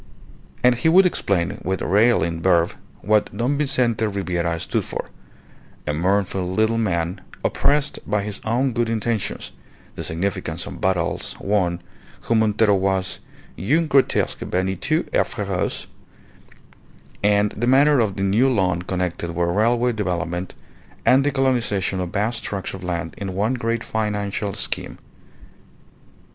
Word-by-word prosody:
And 125 0 +6
he 120 +7 +1
would 185 +3 +6
explain 100 - 0
with 95 +1 -1
railing 95 -5 +2
verve 85 -2 +3 0.3
what 105 +1 +2
Don 125 +5 +1
Vincente 120 -6 +2
Ribiera 90 -4 -1
stood - - -1
for - - -6 0.7
a 75 - -1
mournful 95 +2 0
little 110 +4 +2
man 85 -5 -1 0.2
oppressed 145 0 +1
by 105 -1 +1
his 105 0 -6
own 120 +3 +1
good 120 0 0
intentions, 115 -2 -2 0.4
the - - -6
significance 90 -1 -2
of - - -8
battles 95 -3 -1
won, 90 -4 0 0.4
who - - -1
Montero 110 -1 +3
was 95 -1 0 0.4
(un 150 - +2
grotesque 140 -3 +2
vaniteux 95 0 -1
et - - +4
feroce), - - -2 1.4
and 105 0 +3
the 120 +3 -2
manner 140 +2 +5
of 105 -5 +1
the 95 - -2
new 110 +7 +3
loan 95 -7 +1
connected 90 -2 -3
with 85 0 +1
railway 115 +6 +2
development, 90 -4 -3 0.5
and 135 +2 +5
the 145 - +2
colonization 120 -9 0
of 90 -1 -2
vast 110 +5 -1
tracts 100 -2 -4
of 95 -1 -8
land 85 -2 -3
in 95 -2 -4
one 105 +6 +1
great 115 -2 -1
financial 105 -2 -2
scheme. - - -3
100 Hz, 135 wpm, -22 LUFS, 90-115 Hz, 1.4 s, And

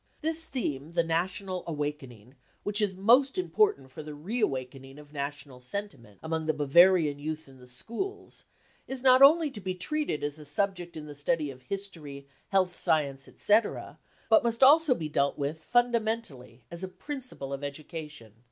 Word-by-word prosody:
This 320 +1 +2
theme, 150 - -4
the 170 -1 +2
national 180 +3 -2
awakening, 145 -7 -5 0.3
which 205 +1 +1
is 200 -3 0
most 245 - +4
important 365 - +1
for 130 - -8
the 150 -1 -8
re 205 +12 -3
awakening 135 -3 -3
of 150 0 -14
national 140 -2 -5
senti 200 +10 -5
ment 110 -6 -19
among 160 0 -2
the 155 - +1
Bavarian 150 +1 +5
youth 155 +1 -5
in 135 -1 -16
the 125 - -15
schools, 235 - -6 0.4
is 265 -1 -4
not 255 0 +6
only 305 +2 +7
to 215 -6 -8
be 185 0 -3
treated 295 - -2
as 145 +1 -3
a 150 - -10
subject 175 +2 -1
of 150 -1 -8
study 150 -1 0
in 130 - -13
history, 150 -3 -6 0.2
health 185 -2 +2
science, 140 -4 0
etc., 210 +1 0 0.3
but 220 - +5
must 235 +2 +1
also 295 0 +7
be 160 - -4
dealt 140 -1 0
with 150 +3 -3
fundamentally 225 - -1
as 170 - -6
k - - -2
principle 255 - -6
of 140 +1 -5
education. 150 -5 -7
160 Hz, 170 wpm, -29 LUFS, 140-220 Hz, 0.4 s, only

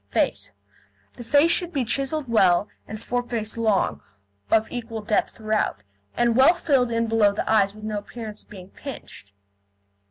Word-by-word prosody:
FACE - - -1 0.6
The 240 - -10
face 290 +7 +4
should 345 0 +1
be 275 -7 -1
chiselled 275 +4 -2
well 195 -4 +3 0.2
and 215 - -7
foreface 240 -2 -3
long, 220 -4 +1 0.5
of 220 0 +3
equal 230 -3 -5
depth 210 0 0
throughout, 215 -1 -1 0.3
and 240 -1 +2
well 270 +8 +6
filled 275 -8 +2
in 230 0 0
below 220 -2 +3
the 205 - -3
eyes 205 -2 +3
with 215 - -12
no 215 -1 -2
appearance 215 0 -9
of - - -26
being 185 -2 -11
pinched. 230 - -10
225 Hz, 160 wpm, -24 LUFS, 215-250 Hz, 0.6 s, well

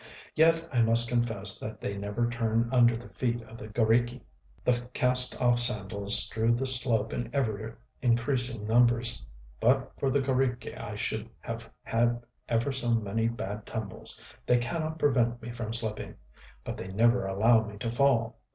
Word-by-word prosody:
Yet 165 +1 +3
I 120 - +3
must 115 +1 +6
confess 115 -5 +1
that 110 - -7
they 100 - -4
never 105 +4 -2
turn 115 -1 -1
under 120 -2 +5
the 120 +2 -9
feet 120 -2 -3
of 115 +1 -13
the 110 - -8
g┼Źriki.... 120 +3 +1 0.4
The 125 0 0
cast 125 0 +2
off 120 -1 +3
sandals 100 -4 +2
strew 110 +2 0
the 125 +3 -1
slope 120 -4 +4
in 120 -1 -4
ever 110 -4 -2 0.2
increasing 120 -2 +1
numbers.... 120 - +2 0.4
But - - +2
for 135 - 0
the 135 - +1
g┼Źriki 130 -2 -1
I 105 -2 -7
should 110 +2 -4
have 115 0 -7
had 120 +1 0 0.3
ever 120 +4 0
so 120 -3 0
many 115 +1 -1
bad 105 -3 -5
tumbles: 110 -4 -2 0.3
they 125 - +4
cannot 155 +7 -3
prevent 120 -6 +1
me 120 +1 -8
from 115 -2 -5
slipping; 110 -2 -3 0.5
but - - -6
they - - -7
never 115 +3 +2
allow 110 +4 +3
me 105 -1 -9
to 115 +2 -4
fall. 120 -2 +1
115 Hz, 165 wpm, -28 LUFS, 110-125 Hz, 0.5 s, must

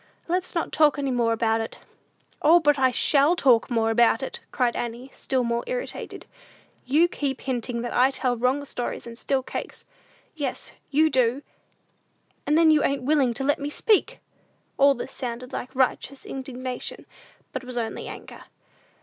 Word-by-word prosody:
Let's 360 +2 -2
not 335 - -1
talk 300 -2 +4
any 275 -2 -1
more 235 -2 +1
about 225 0 +1
it." 225 - -6 0.6
"O, 330 +4 +6
but 295 -3 +3
I 260 -1 +5
shall 285 +5 +3
talk 255 -8 +3
more 225 -2 +1
about 235 +2 +3
it," - - -5
cried 245 -2 +1
Annie, 240 +3 -5
still 260 -2 -1
more 235 0 -1
irritated; - - -5 0.6
"you 305 +6 +4
keep 285 -5 -3
hinting 245 -2 -3
that 240 - -4
I 255 +2 +4
tell 255 -2 -1
wrong 255 +4 0
stories 245 -3 -5
and 235 -1 -9
steal 265 +2 -1
cake; - - -5 0.6
yes, 280 -5 -4 0.2
you 310 +2 +3
do! 255 +2 +1 1.0
and 300 - +3
then 325 -1 +6
you 305 -2 +4
ain't 275 -2 0
willing 270 -4 +2
to 270 - -3
let 290 +1 +1
me 285 +1 -3
speak!" 420 +7 +1 0.6
All 280 0 +5
this 260 - -6
sounded 250 0 -6
like 255 +2 -6
righteous 265 +1 0
indignation, 255 -2 -6 0.5
but 260 - -4
was 250 -1 -7
only 225 -2 -3
anger. - - -10
260 Hz, 165 wpm, -25 LUFS, 240-290 Hz, 1.0 s, O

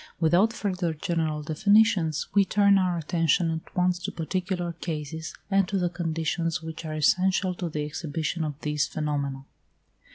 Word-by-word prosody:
Without 175 +7 +4
further 180 -7 -2
general 155 -1 -1
definitions, 180 -1 +3
we 200 - +5
turn 200 0 +4
our 180 -2 +1
attention 165 +1 +1
at 160 0 -6
once 180 0 +2
to 180 - -4
particular 175 +1 -2
cases, 160 -1 -5 0.2
and 195 -1 +3
to 195 - -1
the 180 -2 +1
conditions 165 0 -2
which 160 0 -7
are 155 -1 -4
essential 185 +4 +2
to 175 -1 -4
the 150 -1 -3
exhibition 155 +2 -3
of 150 -2 -4
these 150 -1 0
phenomena. 140 -3 -3
165 Hz, 155 wpm, -26 LUFS, 155-180 Hz, 0.2 s, we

